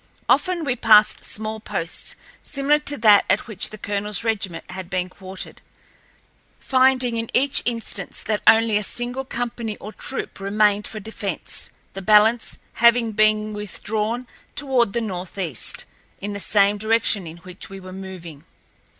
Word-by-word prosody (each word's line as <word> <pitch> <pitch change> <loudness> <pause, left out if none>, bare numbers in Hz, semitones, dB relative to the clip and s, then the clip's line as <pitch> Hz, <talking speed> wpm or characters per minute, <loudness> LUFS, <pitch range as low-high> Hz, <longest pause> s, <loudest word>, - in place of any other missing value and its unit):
Often 360 -4 +2
we 250 -3 0
passed 215 -2 +5
small 220 +1 -3
posts 170 -5 -3 0.3
similar 290 +1 +1
to 290 -1 0
that 210 -3 +6
at 200 - +2
which 215 -5 +1
the 215 - -9
colonel's 205 +1 -1
regiment 200 -7 -2
had 185 -1 -7
been 180 0 -2
quartered, 190 0 -8 1.0
finding 255 -2 +3
in 230 0 -3
each 275 +2 +3
instance 230 -5 -1
that 210 -1 -1
only 225 -1 +6
a - - +1
single 245 +5 -2
company 235 -3 -4
or 210 +2 -9
troop 265 - -5
remained 205 +1 +2
for 215 - -7
defence, 205 -3 -5 0.2
the 195 - -6
balance 215 +3 +4 0.2
having 235 -1 +4
been 215 0 +2
withdrawn 210 +3 -3 0.3
toward 255 -7 +1
the 235 - 0
northeast, 180 - -3 0.3
in 205 +1 -5
the 200 - -4
same 205 0 +3
direction 220 -3 +2
in 160 +1 -9
which 180 +1 -8
we 195 0 -9
were 185 0 -10
moving. 185 -6 -9
215 Hz, 150 wpm, -22 LUFS, 195-235 Hz, 1.0 s, that